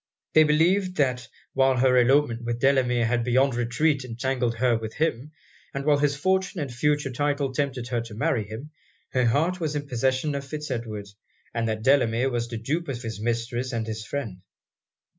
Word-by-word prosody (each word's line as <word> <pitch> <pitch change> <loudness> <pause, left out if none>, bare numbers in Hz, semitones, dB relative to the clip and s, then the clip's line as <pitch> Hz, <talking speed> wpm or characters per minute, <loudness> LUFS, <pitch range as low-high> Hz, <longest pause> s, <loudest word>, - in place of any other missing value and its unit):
They 155 - +7
believed, 180 +5 +2
that 125 -4 +1 0.3
while 135 -1 +3
her 130 +1 +4
elopement 125 -1 +3
with 120 0 -2
Delamere 125 -3 +3
had 120 +1 +1
beyond 130 +3 +3
retreat 130 +5 +1
entangled 125 0 -1
her 120 0 +2
with 110 -1 -5
him, 150 -2 -1 0.4
and 140 0 -3
while 145 -1 +4
his 145 -1 +2
fortune 190 +4 0
and 140 -5 -4
future 145 +2 +1
title 140 +1 -1
tempted 130 -4 -2
her 120 -2 0
to 115 -2 -9
marry 110 -1 0
him, 125 +8 -8 0.4
her 130 -1 +2
heart 165 +10 +1
was 155 -3 -2
in 145 -1 -3
possession 130 +3 0
of 140 0 -3
Fitz 150 +2 -6
Edward; 110 -4 -4 0.5
and 115 -1 -1
that 110 0 -3
Delamere 130 -1 +3
was 120 -1 -1
the 115 -1 -5
dupe 150 +10 -2
of 125 -3 -5
his 110 -2 -5
mistress 120 +2 -2
and 115 -1 -1
his 110 -1 -5
friend. 110 -8 -5
130 Hz, 185 wpm, -25 LUFS, 115-145 Hz, 0.5 s, They